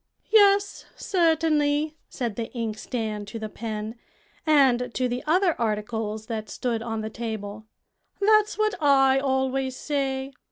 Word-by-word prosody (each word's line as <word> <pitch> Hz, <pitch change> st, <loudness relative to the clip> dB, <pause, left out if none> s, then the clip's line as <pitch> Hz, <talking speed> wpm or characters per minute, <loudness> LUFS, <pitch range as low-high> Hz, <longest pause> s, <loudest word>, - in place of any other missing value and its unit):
"Yes, 405 Hz, -2 st, +4 dB
certainly," 315 Hz, -4 st, +1 dB
said 235 Hz, -6 st, -3 dB
the 230 Hz, -1 st, -4 dB
inkstand 220 Hz, -1 st, -3 dB
to 220 Hz, +3 st, -6 dB
the 215 Hz, -1 st, -5 dB
pen, 220 Hz, +1 st, -5 dB, 0.5 s
and 260 Hz, -5 st, +4 dB
to 255 Hz, -, +1 dB
the 245 Hz, +1 st, -3 dB
other 355 Hz, +2 st, +3 dB
articles 215 Hz, 0 st, -2 dB
that 220 Hz, -2 st, -5 dB
stood 235 Hz, -3 st, -2 dB
on 225 Hz, -1 st, -3 dB
the 215 Hz, -, -4 dB
table; 220 Hz, -2 st, -6 dB, 0.5 s
"that's 425 Hz, +1 st, +3 dB
what 430 Hz, -1 st, +1 dB
I 270 Hz, -2 st, +5 dB
always 265 Hz, -1 st, 0 dB
say. 270 Hz, -2 st, -2 dB
255 Hz, 130 wpm, -25 LUFS, 220-300 Hz, 0.5 s, I